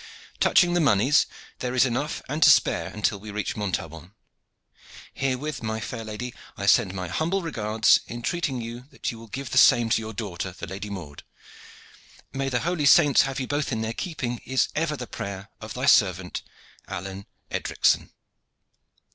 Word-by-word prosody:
Touching 175 -1 +4
the 175 - +3
moneys, 135 +1 +4 0.3
there 125 0 -3
is 130 - +5
enough 135 +4 -2
and 150 +4 -3
to - - +8
spare - - +4
until 105 -1 -1
we 105 +2 -10
reach 105 0 -3
Montaubon. 90 -3 -4 1.0
Herewith, 135 +2 -2
my 110 -1 -2
fair 115 +1 -5
lady, 110 +3 -6 0.2
I - - -3
send 95 - +4
my 90 -1 -3
humble 170 - -1
regards, 110 -8 +3
entreating 130 +2 -2
you 120 +3 -7
that - - -4
you 115 - -10
will 115 - -12
give 135 +2 -6
the - - +5
same 115 -1 +5
to - - +3
your 110 0 -6
daughter, 95 -4 -5
the - - -6
Lady 100 +3 -6
Maude. 80 -8 -7 1.1
May 135 0 -1
the 125 -2 0
holy 165 -3 0
saints 140 -1 +7
have 135 0 -2
you 130 - -2
both 145 +2 -2
in 110 -2 -1
their 110 0 -2
keeping 120 -5 -4
is 130 +1 +1
ever 155 -1 -1
the 125 - -5
prayer 100 -2 -6
of 110 -1 -7
thy 130 +1 -2
servant, 95 -8 +3 0.5
"ALLEYNE 95 +2 -6 0.2
EDRICSON." - - +1
115 Hz, 170 wpm, -25 LUFS, 105-135 Hz, 1.1 s, to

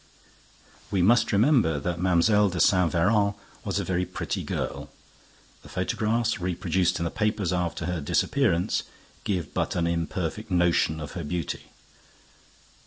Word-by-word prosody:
We 95 -3 +1
must 120 +6 +4
remember 105 - +3
that 85 +4 -3
Mlle. 95 +4 +3
de 90 0 -4
Saint 90 -3 +4
Véran 100 +4 +2 0.3
was - - -2
a - - -1
very 90 -1 0
pretty - - -4
girl. - - -4 0.7
The - - -14
photographs 115 +1 0
reproduced 90 0 0
in 85 - -2
the 85 - -2
papers 105 -5 0
after 90 -2 -2
her 90 -3 -2
disappearance 90 - +1 0.4
give 90 -7 -2
but - - -1
an 85 -2 +1
imperfect 85 +4 -2
notion 85 -3 +2
of 75 -2 -6
her 85 - -5
beauty. 85 +1 -4
90 Hz, 140 wpm, -26 LUFS, 85-105 Hz, 0.7 s, must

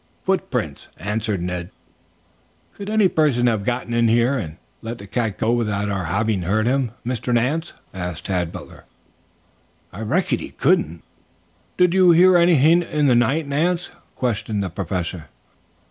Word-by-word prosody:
"Footprints," - - -2
answered 105 -2 -2
Ned. 90 0 -4 1.0
"Could 200 0 -7
any 215 -2 +4
person 145 -8 +2
have 110 -4 +1
gotten 120 +1 -2
in 120 0 +3
here 120 +4 +3
and 85 - -5 0.2
let 115 +1 -6
the 100 - -10
cat 110 -1 -2
go 115 0 +1
without 105 -4 -1
our 95 -3 -2
having 100 +3 0
heard 105 +5 0
him, 125 -2 0
Mr. 125 0 -2
Nance?" 135 +8 0 0.2
asked 90 -3 -5
Tad 90 -3 -1
Butler. - - -11 1.1
"I 100 - -7
reckon 110 - 0
he - - -7
couldn't." 80 +2 0 0.7
"Did 180 -1 +4
you 185 -1 +5
hear 180 +2 +6
anything 170 -1 +5
in 150 -3 -1
the 130 - +5
night, 135 +6 +2
Nance?" 170 +5 0 0.2
questioned 110 -4 -2
the 95 - -4
Professor. 90 -3 -4
115 Hz, 150 wpm, -21 LUFS, 100-145 Hz, 1.1 s, hear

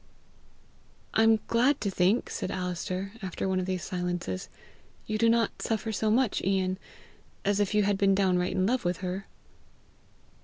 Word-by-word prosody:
"I - - +4
am 225 -1 +5
glad 255 +5 +3
to 200 - -1
think," 190 +6 +2
said - - -3
Alister, 185 +1 -3
after 190 0 -3
one 190 -1 +1
of 185 - -3
these 185 -3 -2
silences, 175 - -3 0.6
"you 215 0 -2
do 230 0 +4
not 230 0 +1
suffer 225 0 -1
so 220 0 0
much, 235 0 +2
Ian, 190 -1 0 0.7
as 205 0 +2
if 205 0 +1
you 210 - +4
had 200 -1 +1
been 195 -1 +4
downright 185 -2 +2
in 185 0 +1
love 250 +5 +1
with 175 0 -1
her." 185 +2 -4
195 Hz, 165 wpm, -28 LUFS, 185-215 Hz, 0.7 s, am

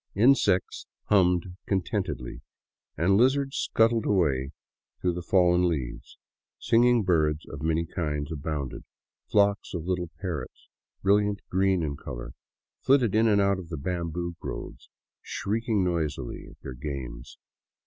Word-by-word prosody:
Insects 105 -4 +3 0.2
hummed 90 -2 +3
contentedly 95 - -2 0.6
and 95 +5 +3
lizards 135 +3 +2
scuttled 115 0 +2
away 70 -9 +2 0.5
through 90 -1 0
the 90 - -4
fallen 90 0 +3
leaves. 65 -8 -5 0.4
Singing 120 0 +3
birds 80 -4 +1
of 70 - -8
many 80 +1 +1
kinds 75 -4 -3
abounded; 75 -3 -4 0.5
flocks 100 -2 +2
of 85 -2 -4
little 90 -2 -1
parrots, 90 -6 -6 0.3
brilliant 100 +1 +2
green 95 -1 +2
in 70 -2 -3
color, - - -7 0.5
flitted 130 -6 +3
in 110 +1 +4
and 105 -2 +4
out 100 -1 +2
of 85 -3 -9
the 80 - -4
bamboo 85 +2 -3
groves, - - -7 0.3
shrieking 110 0 -1
noisily 80 -7 -2
at - - -18
their 65 - -7
games. 65 0 -7
90 Hz, 130 wpm, -27 LUFS, 75-100 Hz, 0.6 s, in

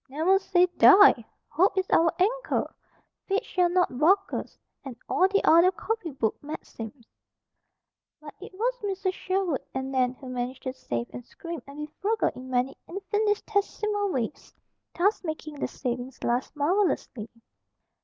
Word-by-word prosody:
"Never 330 +8 +2
say 360 -2 +3
die! 395 - +8 0.2
Hope 380 +4 +2
is 375 0 +1
our 330 0 +4
anchor! 460 +7 0 0.5
Fate 395 +1 0
shall 360 -1 +1
not 350 -8 +1
balk 390 +6 +3
us! - - -5 0.3
And 270 -4 -7
all 370 - +3
the 400 +1 +1
other 335 +3 +7
copy 415 0 -3
book 245 -6 -2
maxims." 240 -5 -8 1.1
But 300 -1 -11
it 405 - -9
was 475 +5 0
Mrs. 385 -1 -1
Sherwood 370 -7 -1
and 265 0 -3
Nan 255 -1 +1
who 260 - -12
managed 250 +1 -4
to 260 - -3
save 120 - -4
and 245 - -7
scrimp 335 +6 -8
and 280 +1 -11
be 300 - -4 0.2
frugal 435 +2 +1
in 255 +1 -10
many 255 +1 0
infinitesimal 415 +1 -1
ways, 240 -7 -4 0.4
thus 395 +5 +2
making 310 -3 -6
their - - -1
savings 250 0 -5
last 245 +5 -1
marvelously. 295 - 0
335 Hz, 150 wpm, -27 LUFS, 260-390 Hz, 1.1 s, die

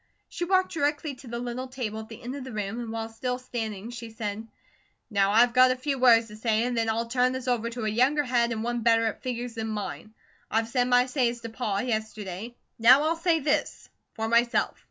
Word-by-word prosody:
She 345 - -3
walked 375 +1 +2
directly 295 -1 -1
to 260 0 -13
the 235 0 -4
little 245 +2 -4
table 240 -5 -4
at 220 - -9
the 225 - -11
end 250 +3 -5
of 280 - -6
the 260 - -8
room, 210 +1 -3
and 235 -2 -5
while 225 0 -3
still 250 +3 -3
standing 225 -4 -5
she 240 -1 -7
said: 220 -1 -5 0.6
"Now 200 -1 +3
I've 235 +3 +5
got 255 +1 +7
a 255 - +2
few 270 +1 -2
words 230 -3 +5
to 210 - -10
say, 220 0 +1
and 245 0 -1
then 225 -1 +1
I'll 225 +1 0
turn 250 +2 +1
this 260 0 -5
over 235 -2 0
to 235 -1 -5
a - - 0
younger 255 +7 +2
head 240 -2 +1
an' 220 -1 -2
one 240 0 -2
better 230 0 +4
at 220 - -3
figures 245 -1 -4
than 225 -1 -4
mine. 215 0 -5 0.3
I've 225 +1 0
said 245 0 +1
my 245 0 +4
say 255 -2 +1
as 240 0 -7
to 230 - -6
Pa, 220 -3 -2
yesterday. 220 -2 -4 0.2
Now 255 +5 +7
I'll 320 +2 +1
say 330 -1 +1
THIS, 300 +2 -1 0.3
for 225 -1 -2
myself. 235 +1 +2
235 Hz, 235 wpm, -27 LUFS, 225-255 Hz, 0.6 s, got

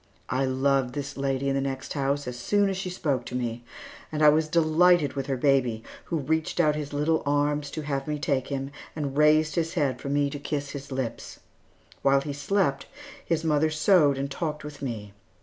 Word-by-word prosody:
I 130 +2 +1
loved 130 -1 +1
this 140 -1 -4
lady 135 0 -1
in 135 - +1
the 135 - 0
next 135 -1 -4
house 140 0 -1
as 125 - -4
soon 200 +12 +1
as 190 - -3
she 190 -1 -3
spoke 145 -8 -1
to 125 - -6
me, 120 -1 -3 0.5
and 155 0 0
I 150 - +9
was 155 +1 +3
delighted 165 -1 +4
with 135 -1 -4
her 135 -2 -1
baby, 125 -5 +2 0.2
who 165 - -2
reached 160 +3 -1
out 155 -3 +4
his 150 -1 -4
little 150 +3 +1
arms 145 0 0
to 155 +2 -5
have 140 -1 -3
me 150 0 -1
take 140 -4 -1
him, 135 -1 -4 0.2
and 145 -3 -3
raised 155 +1 +4
his 165 +1 -1
head 135 -6 0
for 140 - -5
me 145 0 +1
to 145 - -5
kiss 145 0 -3
his 140 -1 -8
lips. 130 -3 -4 0.6
While 135 0 +4
he 145 0 -4
slept, 145 -1 0 0.4
his 165 -1 -1
mother 155 -1 +2
sewed 155 -3 +4
and 140 +1 -3
talked 155 -1 -3
with 150 -1 -9
me. 110 -6 -5
145 Hz, 205 wpm, -26 LUFS, 135-155 Hz, 0.6 s, I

